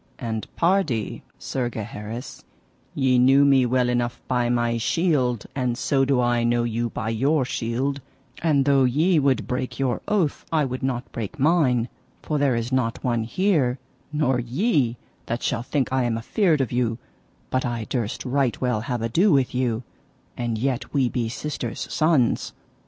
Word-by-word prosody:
And 110 -3 -4
pardie, 165 - +1 0.2
Sir 125 -2 -2
Gaheris, 110 +2 -7 0.5
ye 130 -2 +3
knew 135 +3 +6
me 135 -3 +4
well 125 0 +2
enough 120 0 -1
by 125 -2 +1
my 120 -1 +1
shield, 130 - +1
and 125 -3 -1
so 135 0 +2
do 135 -2 +2
I 120 -1 +2
know 120 0 +2
you 120 0 -1
by 110 -1 -4
your 135 +5 +1
shield, 130 +4 -2 0.4
and 145 -5 +2
though 140 -1 +4
ye 155 +7 +3
would 135 -2 +1
break 130 0 -3
your 130 -3 -1
oath 185 -8 0
I 155 -3 +2
would 130 0 -4
not 130 -2 -2
break 110 -4 -5
mine; 135 -6 +3 0.4
for 150 -2 -1
there 140 -3 +2
is 115 +2 -2
not 125 -3 0
one 120 -3 0
here, 145 - +1 0.3
nor 150 -4 +1
ye, 125 - +1 0.3
that 120 +2 -3
shall - - 0
think 130 +1 -1
I 130 -1 +2
am 115 -1 0
afeard 155 - +1
of 130 - -2
you, 120 -2 0 0.5
but 130 - +1
I 120 -2 -2
durst 120 0 -3
right 135 -1 0
well 125 -4 0
have 120 -1 -3
ado 170 - +3
with 135 -4 +2
you, 125 -2 0 0.5
and 120 -2 -2
yet 130 +4 -2
we 130 -3 +3
be 120 -2 -2
sisters' 150 +6 -5
sons. 155 -7 +2
125 Hz, 170 wpm, -24 LUFS, 120-140 Hz, 0.5 s, knew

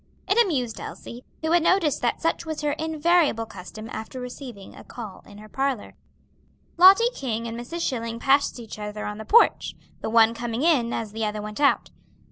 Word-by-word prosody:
It 435 +5 +5
amused 255 - -2
Elsie, 240 +1 -9 0.2
who 320 - 0
had 345 0 +5
noticed 335 -4 +2
that 240 - -1
such 330 +1 0
was 315 -2 -5
her 295 -1 0
invariable 320 -4 +1
custom 215 +2 -10
after 220 +4 -6
receiving 250 -5 -9
a - - -12
call 215 -6 -9
in 205 - -13
her 215 +1 -12
parlor. 270 -1 -2 0.8
Lottie 390 +7 +7
King 235 - -3
and 230 - -5
Mrs. 290 +9 -4
Schilling 230 -3 -3
passed 275 0 +2
each 225 -2 -9
other 210 0 -5
on 210 +1 -5
the 220 - -7
porch, 470 +2 +4 0.3
the - - -3
one 225 0 +5
coming 235 +2 -3
in 275 -9 +3
as 220 -2 -3
the 220 +1 -4
other 210 0 -3
went 210 +2 -7
out. 280 - +2
245 Hz, 190 wpm, -24 LUFS, 220-315 Hz, 0.8 s, Lottie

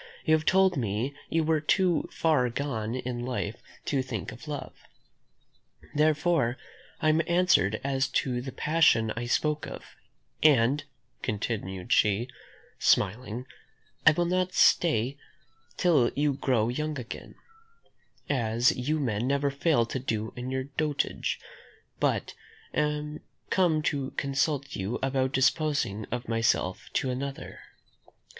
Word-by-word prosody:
You 155 - +4
have 155 0 +2
told 190 -2 +4
me 115 +3 -1 0.2
you 165 0 +1
were 155 -1 +1
too 180 +1 +2
far 150 -7 +2
gone 120 -3 -3
in 125 -1 -4
life 120 -3 -3 0.2
to 140 -2 +1
think 120 -6 -5
of 125 - -12
love. 145 -3 -5 1.2
Therefore, 150 -4 +2 0.4
I 155 - +3
am 155 +1 +4
answered 170 - +3
as 135 -1 +1
to 130 -1 -1
the 130 +1 -6
passion 150 -10 +3
I 120 +1 -4
spoke 150 +4 0
of; - - -8 0.6
and," 140 -1 +4 0.4
continued 100 -4 -2
she, 105 +4 +2 0.5
smiling, 115 +4 +1 0.6
"I - - +7
will 175 +3 +1
not 185 +1 0
stay 140 -5 +3 0.6
till 150 -9 +4
you 145 0 +2
grow 125 -5 +1
young 150 +4 -2
again, 125 -2 -8 0.9
as 120 -3 +2
you 150 +5 -1
men 120 -4 -1
never 140 +1 +1
fail 140 -3 +2
to 130 - -4
do 110 -3 -3
in 125 +1 -5
your 130 0 -1
dotage, 145 +2 -2 0.6
but - - 0 0.4
am 150 0 -1 0.3
come 165 -5 +3
to 140 -2 -1
consult 140 0 -1
you 100 +5 -2
about 130 -1 +1
disposing 135 -6 +1
of 120 0 -5
myself 115 -5 0
to 130 - 0
another. 135 +2 -5
135 Hz, 130 wpm, -28 LUFS, 120-150 Hz, 1.2 s, I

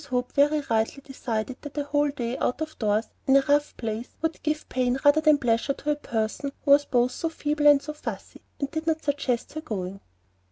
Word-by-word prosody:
Hope 250 -1 -1
very 295 +2 +3
rightly 230 +1 -1
decided 250 -2 -3
that 290 0 -9
a 290 - +1
whole 290 0 +1
day 245 -3 -3
out 250 - 0
of 315 0 -5
doors, 215 0 +1 0.2
in 270 - +5
a - - +5
rough 290 +1 +2
place, 225 +1 -4
would 325 -1 -1
give 305 0 -2
pain 255 0 0
rather 290 +2 +6
than 305 -1 +5
pleasure 240 +1 +1
to 295 +2 -2
a - - +1
person 235 0 -2
who 280 - +3
was 285 +1 +7
both 245 0 +2
so 330 - -2
feeble 295 -1 0
and 290 -1 +7
so 300 - -5
fussy, 300 - -7 0.2
and 280 -1 -2
did 320 0 -4
not 320 -1 0
suggest 280 -4 -1
her 310 - -4
going. 195 - -5
280 Hz, 215 wpm, -26 LUFS, 245-295 Hz, 0.2 s, was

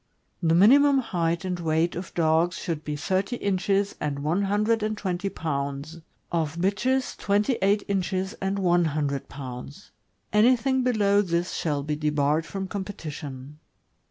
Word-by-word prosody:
The 165 -1 +3
minimum 275 +9 +6
height 170 -8 -1
and 180 -1 -2
weight 165 +1 +1
of 180 0 -6
dogs 165 +1 +2
should 165 -4 -4
be 150 -1 -3
thirty 190 - -1
inches 200 -1 0
and 140 -1 -3
one 165 +6 +1
hun 205 +1 +1
dred 225 +1 +2
and 215 0 -1
twenty 190 -1 -2
pounds; 140 0 -4 0.3
of 165 -2 -1
bitches, 220 +9 0
twenty 205 +4 +1
eight 200 +2 +3
inches 190 0 -1
and 195 +1 -1
one 175 -2 +3
hundred 145 -3 -2
pounds. 135 +6 -9 0.4
Anything 255 +4 +4
below 205 -5 +3
this 175 -2 -1
shall 145 -3 -1
be 150 +1 -2
debarred 150 +1 +1
from 195 -1 -4
competition. 150 -8 -7
180 Hz, 150 wpm, -26 LUFS, 155-200 Hz, 0.4 s, minimum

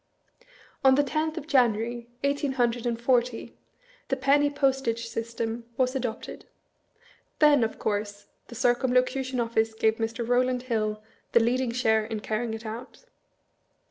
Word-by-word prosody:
On 265 -1 +6
the 290 - +3
tenth 310 +3 -2
of 295 - -5
January, 235 -4 +1
eighteen 280 0 0
hundred 240 -2 0
and 235 -1 -1
forty, 240 -1 0 0.5
the 265 - 0
penny 280 +2 +3
postage 265 -5 0
system 230 0 -4
was 255 0 +1
adopted. 245 -4 -4 0.9
Then, 295 -5 +5
of 225 - -2
course, 205 -1 -3 0.2
the 235 - -11
Circumlocution 255 +2 +1
Office 225 -1 0
gave 220 0 +2
Mr. 225 +1 -3
Rowland 250 0 +1
Hill 215 -3 -2
" - - -40
the - - +7
leading 245 +2 +1
share 220 -2 +2
in 220 0 -4
carrying 220 +1 -2
it 225 +1 -9
out"? 235 - -8
240 Hz, 140 wpm, -27 LUFS, 225-260 Hz, 0.9 s, the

